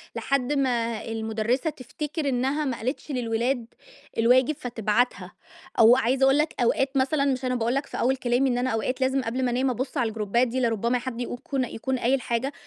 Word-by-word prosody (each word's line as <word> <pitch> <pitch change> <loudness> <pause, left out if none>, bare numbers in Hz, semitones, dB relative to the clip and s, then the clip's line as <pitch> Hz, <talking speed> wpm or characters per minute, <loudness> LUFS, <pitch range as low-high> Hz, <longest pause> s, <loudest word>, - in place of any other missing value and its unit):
لحد 275 0 0
ما 235 -5 0
المُدرسة 225 +5 -1
تفتكر 295 +2 -4
إنّها 270 +4 0
ما 255 -3 -2
قالِتش 260 +5 -4
للولاد 240 0 -1 0.5
الواجب 250 +5 +4
فتبعَتها. 240 -1 -1 0.5
أو 230 +2 +8
عايزة 260 +1 +1
أقول 270 +1 +4
لك 300 +1 0
أوقات 270 +3 +1
مثلًا، 275 +2 +2
مش 265 -2 0
أنا 255 - 0
باقول 235 +1 0
لك 275 +1 -1
في - - -7
أوَّل 260 +2 +2
كلامي 250 +1 +1
إن 245 - 0
أنا 250 +1 0
أوقات 255 +4 -2
لازم 265 +1 +2
قبل 255 +2 -2
ما 245 - 0
أنام 255 +2 +1
أبُص 255 +2 -3
على 230 -2 +1
الجروبات 220 +3 +1
دي، 255 +2 -2
لربما 235 +1 +1
حد 245 -1 -5
يقو 245 - -4
يكو 260 +3 -5
يكون 255 0 -2
قايِل 255 +3 +1
حاجة. 245 +4 -2
250 Hz, 195 wpm, -25 LUFS, 235-270 Hz, 0.5 s, أو